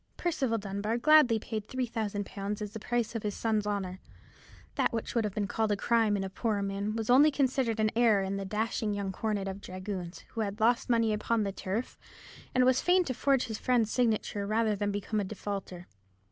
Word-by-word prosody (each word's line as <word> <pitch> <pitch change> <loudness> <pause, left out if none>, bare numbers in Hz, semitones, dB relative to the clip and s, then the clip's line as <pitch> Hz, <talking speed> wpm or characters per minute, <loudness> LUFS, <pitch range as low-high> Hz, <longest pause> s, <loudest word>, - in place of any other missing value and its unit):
Percival 270 -9 0
Dunbar 205 +2 -2
gladly 295 -3 +6
paid 215 -1 -5
three 255 -1 -2
thousand 210 -3 -3
pounds 200 +1 -4
as 210 -1 -5
the 220 - -7
price 240 +1 -1
of 225 - -3
his 205 -1 -3
son's 215 -2 0
honour. 190 -3 -3 0.7
That - - +1
which 225 -1 -3
would 230 -2 +1
have 205 -2 -4
been 210 -2 0
called 220 +1 0
a 205 - +1
crime 225 -2 +2
in 195 - -2
a 190 - -4
poorer 210 -1 -1
man 200 +2 -2
was 225 +1 -1
only 285 +5 +7
considered 260 -5 0
an 215 0 +2
error 225 -4 +4
in 190 +1 -2
the 195 - -3
dashing 215 +1 -1
young 200 -1 -2
cornet 205 0 -2
of 195 +1 -5
dragoons, 185 -2 -6
who 225 - -4
had 205 0 -3
lost 235 +3 +2
money 230 -2 +3
upon 215 +1 0
the 200 - -2
turf, 200 +5 -4 0.6
and 255 0 +5
was 255 0 +4
fain 360 +1 +4
to 265 - -3
forge 270 +1 +2
his 220 -2 -5
friend's 235 -4 +2
signature 215 -4 0
rather 215 0 +1
than 205 0 -1
become 205 +2 -2
a - - 0
defaulter. 195 -3 -5
215 Hz, 215 wpm, -30 LUFS, 200-235 Hz, 0.7 s, only